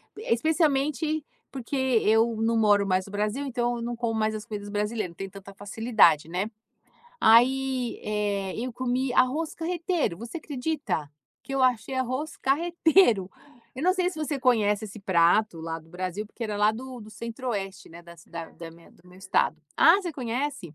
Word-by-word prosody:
p 425 - -9
especialmente 305 +1 +1 0.3
porque 265 +1 -5 0.3
eu 225 +1 +3
não 230 0 +2
moro 205 -2 +4
mais 185 0 +1
no 200 - -12
Brasil, 210 +7 -2
então, 240 -2 -1
eu - - -6
não 240 +1 -3
como 235 -1 -2
mais 215 0 +1
as 215 -1 -5
comidas 205 -3 -6
brasileiras. 210 -1 -2
Não - - -18
tenho 195 +3 -6
tanta 200 0 -11
facilidade, 205 -5 +3
né. 185 +5 -2 0.7
Aí, 255 +2 +4
eh, 205 -2 -1
eu 250 +2 -3
comi 255 +1 -1
arroz 300 +5 +2
carreteiro, 335 - -1
você 235 +9 -6
acredita? 285 - -3 0.3
Que 270 - -6
eu 270 - +1
achei 250 0 +1
arroz 260 +4 -2
carreteiro! 315 - +3 0.5
Eu 265 - -4
não 365 +2 +4
sei 365 -2 +1
se 320 - -9
você 305 -2 -2
conhece 215 -4 +2
esse 215 +1 -10
prato 185 0 +2
lá 165 0 -4
do 160 0 -19
Brasil 185 +3 -4
porque 225 - -10
ele 215 -2 -2
é - - -2
lá 210 +1 +3
do 255 +2 -8
do 215 0 -11
Centro-Oeste, 220 -3 -5
né, 170 +1 -11
da 170 0 -14
cidad 165 0 -9
da 165 -1 -8
minha 165 +1 -18
do 175 - -23
meu 180 +1 -16
estado. 190 - +1 0.2
Ah, 330 +3 +7
você 375 -3 -3
conhece? 255 - -4
230 Hz, 185 wpm, -26 LUFS, 200-270 Hz, 0.7 s, Ah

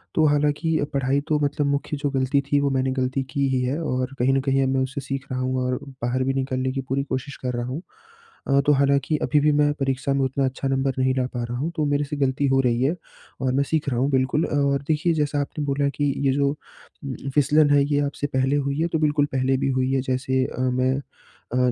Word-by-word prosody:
तो 160 - +4
हालाँकि 150 +2 +1 0.2
पढ़ाई 135 +1 +1
तो 150 -1 +2
मतलब 145 0 0
मुख्य 140 +1 -1
जो 145 0 -1
गलती 130 +2 +2
थी 145 - +4
वो 140 0 +1
मैंने 130 0 0
गलती 130 +1 -1
की 140 -2 +1
ही 130 -1 +1
है 135 +6 -1
और 130 -3 -2
कहीं 130 +2 +3
न 135 - +3
कहीं 135 0 +3
अब 130 - +1
मैं 130 - +2
उसे 140 +2 -4
सीख 135 +1 -4
रहा 130 - -2
हूँ 130 0 -1
और 125 0 -1 0.2
बाहर 125 +2 0
भी 135 +1 0
निकलने 130 -1 -1
की 135 0 -3
पूरी 140 +1 0
कोशिश 140 0 -4
कर 125 -1 -2
रहा 120 - -2
हूँ। 140 +7 -4 0.7
अ, 140 0 +4
तो 150 - +5
हालाँकि 140 +2 +2
अभी 150 - +3
भी 150 +1 +3
मैं 145 0 +3
परीक्षा 135 0 0
में 135 -1 +1
उतना 135 +1 0
अच्छा 130 +1 -2
नंबर 135 0 0
नहीं 130 0 +2
ला 130 - +1
पा 120 -1 -2
रहा 120 +1 -4
हूँ, 160 +6 -2
तो 155 -3 0
मेरे 145 0 +1
से 145 +1 -5
गलती 140 0 +1
हो 135 0 +3
रही 120 -1 +1
है, 155 +6 +1 0.5
और 130 -1 +1
मैं 140 +1 +2
सीख 150 -1 -1
रहा 120 -2 -1
हूँ, 135 +2 +2
बिल्कुल। 130 +4 +1
और 140 -1 +1
देखिए 160 +2 +1
जैसा 145 -2 0
आपने 145 +1 -4
बोला 140 0 +1
कि 145 -2 +1
ये - - +4
जो 140 0 +2 0.5
उम, 135 -2 -4 0.2
फिसलन 150 +1 +4
है 140 -1 +5
ये 145 0 +1
आपसे 145 0 -3
पहले 130 +2 +2
हुई 140 +1 -1
है? 170 - +2
तो 160 -2 -1
बिल्कुल 145 -1 +2
पहले 130 0 +1
भी 135 - 0
हुई 130 +1 +1
है, 135 - +2
जैसे 130 0 0
अ, - - -7
मैं 130 +1 +1 0.5
अ, 125 - +1
135 Hz, 250 wpm, -23 LUFS, 130-145 Hz, 0.7 s, तो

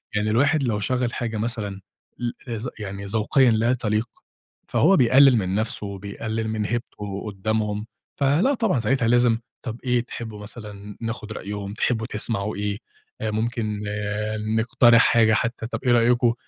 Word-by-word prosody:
يعني 105 +1 +1
الواحد 140 +6 +3
لو 110 -4 0
شغّل 125 +3 0
حاجة 115 -3 -3
مثلًا 105 -3 -3 0.4
ل 120 -1 -1 0.3
ذ 120 +4 -5
يعني 100 -1 -6
ذوقيًا 115 +5 +3
لا 115 +3 +2
تليق 110 -1 -1 0.6
فهو 190 +5 +4
بيقلل 130 0 +6
من 95 -1 -1
نَفسه، 110 -1 -1
وبيقلل 105 +3 -4
من 110 -1 -1
هيبته 105 -3 -4
قدّامهم، 105 +1 -2 0.3
فلأ 150 - +3
طبعًا 225 - +1
ساعتها 115 +1 +1
لازم 120 -2 +4 0.3
طَب 115 -1 -5
إيه 125 -2 +2
تحبوا 110 -3 -7
مثلًا 105 -1 -9
ناخد 115 -1 -5
رأيهم، 100 0 -5
تحبوا 110 0 0
تسمعوا 105 -1 -2
إيه؟ 100 0 -2 0.4
آآ، 110 -1 -1
ممكن 110 -1 -2 0.8
نقترح 120 0 +5
حاجة 110 -2 +4
حتى 115 0 -1
طَب - - -4
إيه 125 - +4
رأيكم 120 0 +4
110 Hz, 150 wpm, -24 LUFS, 105-120 Hz, 0.8 s, بيقلل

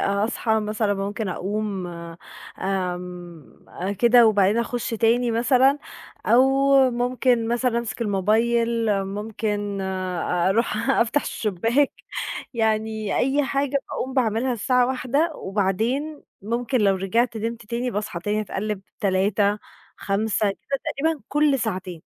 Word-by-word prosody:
أصحى 220 +2 0
مثلًا، 210 -1 0
ممكن 200 +1 -3
أقوم 200 0 -3 0.7
آمم 180 -4 -5
أ 190 +3 -4
كده 235 +3 +5
وبعدين 205 0 +3
أخُش 240 0 -2
تاني 230 +2 +2
مثلًا، 255 +4 +3 0.5
أو 245 +3 +6 0.5
ممكن 245 -1 +1
مثلًا 240 0 +1
أمسك 235 0 -4
الموبايل، 230 +3 +1
ممكن 205 0 -3
أروح 190 +4 0
أفتح 235 +5 +2
الشُباك، 230 +7 0 0.6
يعني 220 -2 0
أي 275 +2 +2
حاجة 280 0 0
باقوم 260 - -4
باعملها 245 0 +1
الساعة 250 +2 +2
01:00 280 +5 0
وبعدين، 220 +10 -1 0.2
ممكن 240 +4 -1
لو 195 -1 +4
رجعت 225 +5 0
نمت 230 0 -4
تاني، 240 +2 -2
باصحى 210 -3 -3
تاني 210 +4 -1
اتقلِّب 205 0 -4 0.2
03:00 200 +1 +1 0.4
05:00 205 +1 0
كده 275 +7 -4 0.2
تقريبًا 315 +1 0
كلّ 295 -2 +2
ساعتين. 185 -6 -4
220 Hz, 115 wpm, -23 LUFS, 200-245 Hz, 0.7 s, أو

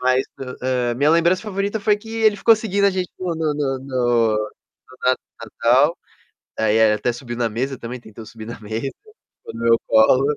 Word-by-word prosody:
Mas 130 +1 +2 0.4
a 125 -2 0
a - - -3
minha 145 +5 +3
lembrança 170 +3 +3
favorita 205 0 -2
foi 210 0 +3
que 220 +2 -12
ele 220 -2 +3
ficou 225 +2 +5
seguindo 200 -2 -1
a 200 - +4
gente 185 -1 -2
no 180 -2 -2
no 160 -2 -1
no 135 -3 -1
no 120 -4 +1 0.7
na 130 0 +4 0.5
Natal, 135 +8 +4 0.6
aí, 110 0 +2
eh, 110 -1 +5
até 120 - -1
subiu 120 -1 -7
na 120 -1 0
mesa 130 +4 -3
também, 120 +1 -6
tentou 110 -1 -12
subir 110 0 -10
na 115 0 -8
mesa, 110 +2 -4 0.6
ficou - - -11
no 115 - -7
meu 115 0 +5
colo. 130 +6 +4
130 Hz, 195 wpm, -21 LUFS, 115-175 Hz, 0.7 s, ficou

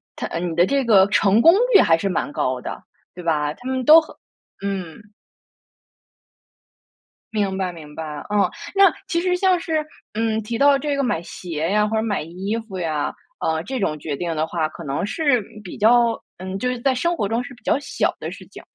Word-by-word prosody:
它 - - -4
呃， - - -4
你 170 -1 -3
的 170 +1 +5
这 275 +5 +1
个 200 -5 +6
成 205 +1 +3
功 330 +6 +8 0.2
率 - - +9
还 165 - +4
是 195 +4 -2
蛮 180 - -2
高 130 -3 -1
的， - - -7 0.3
对 180 - -9
吧？ 150 -3 0
他 245 - -11
们 260 -1 -2
都 320 +4 +9
很 315 - -13 0.5
嗯。 195 0 -5 2.2
明 200 -3 0
白， 185 -2 -1
明 150 -3 -12
白， 160 - -5 0.3
嗯， 205 -1 +3 0.3
那 390 -3 +6
其 335 - 0
实 360 +1 +1
像 365 -1 +2
是 320 -2 -1 0.3
嗯， 220 0 0
提 230 +3 -4
到 280 +3 +5
这 285 +1 -2
个 280 - 0
买 245 -11 0
鞋 165 -3 -4
呀， 210 +3 +2
或 220 - -2
者 220 - 0
买 215 -3 -1
衣 185 +7 -4
服 190 - -6
呀， 155 -4 -1 0.3
呃， 160 0 -1
这 260 +6 -4
种 155 -6 -1
决 150 -1 -4
定 165 +2 -3
的 155 0 0
话 160 -1 -2
可 170 - -10
能 140 -2 -2
是 255 - +1 0.2
比 180 - -8
较 235 +2 +4 0.3
嗯， 185 +1 -5
就 250 - 0
是 250 -1 -3
在 270 +1 +2
生 340 +7 0
活 205 - 0
中 230 +4 -1
是 280 - -10
比 245 - -24
较 - - +2
小 285 - -1
的 - - -5
事 - - -11
情， - - -12
205 Hz, 225 characters per minute, -22 LUFS, 170-255 Hz, 2.2 s, 率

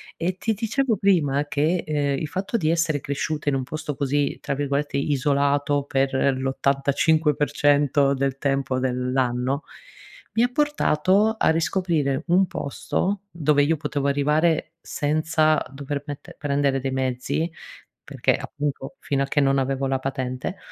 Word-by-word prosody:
E 180 +2 -2
ti 220 +3 0
dicevo 230 +3 0
prima 155 -8 +2
che, 155 +5 0
ehm, 145 -2 0
il 155 - -3
fatto 195 +6 -3
di 160 -7 +2
essere 165 -4 +1
cresciuta 145 +1 -2
in 135 - +1
un 130 - -1
posto 150 +2 -5
così, 145 0 0
tra - - -3
virgolette, 145 +1 -2
"isolato" 145 +1 +1
per 135 -1 0 0.2
l'85% 145 +1 +2
del 135 0 -1
tempo 135 -2 0
dell'anno, 125 +1 0 0.7
mi 225 - +3
ha 245 - +2
portato 220 - +2
a - - +3
riscoprire 160 -4 0
un 185 +3 +4
posto 185 +6 -2
dove 150 -3 +2
io 160 +3 +2
potevo 145 -2 -2
arrivare 150 +4 +1
senza 155 0 +1
dover 140 +1 -5
mette 145 -2 -8
prendere 140 -2 0
dei 135 0 -3
mezzi, 130 +5 -1 0.5
perché - - 0
appunto 140 -2 -5
fino 140 -1 -1
a - - 0
che 145 - +1
non 135 0 +3
avevo 135 0 0
la 135 0 +1
patente, 130 +4 -4
145 Hz, 140 wpm, -24 LUFS, 135-160 Hz, 0.7 s, un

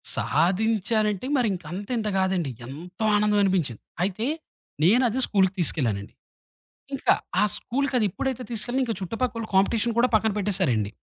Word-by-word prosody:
సాధించానంటే 215 +2 +1
మరింక 205 -8 0
అంత 200 +2 -6
ఇంత 215 -1 -2
కాదండి. 185 -6 0 0.2
ఎంతో 170 - -7
ఆనందం 210 0 +3
అనిపించింది. 175 - 0 0.2
అయితే, 200 +4 -1 0.6
నేనదే 235 +6 +4
స్కూలుకి 190 -2 +2
తీసుకెళ్ళానండి. 115 - 0 0.8
ఇంకా - - +3 0.3
ఆ - - +5
స్కూలుకి 275 +2 -2
అది 215 - +2
ఎప్పుడైతే 255 +5 -3
తీసుకెళ్ళానో 240 +3 -1
ఇంక 230 -3 -1
చుటుపక్కోళ్ళు 230 +3 -3
కాంపిటీషన్ 220 +4 +2
కూడా 240 +1 +5
పక్కన 220 0 +2
పెట్టేసారండి. 180 - +1
205 Hz, 130 wpm, -25 LUFS, 180-230 Hz, 0.8 s, ఆ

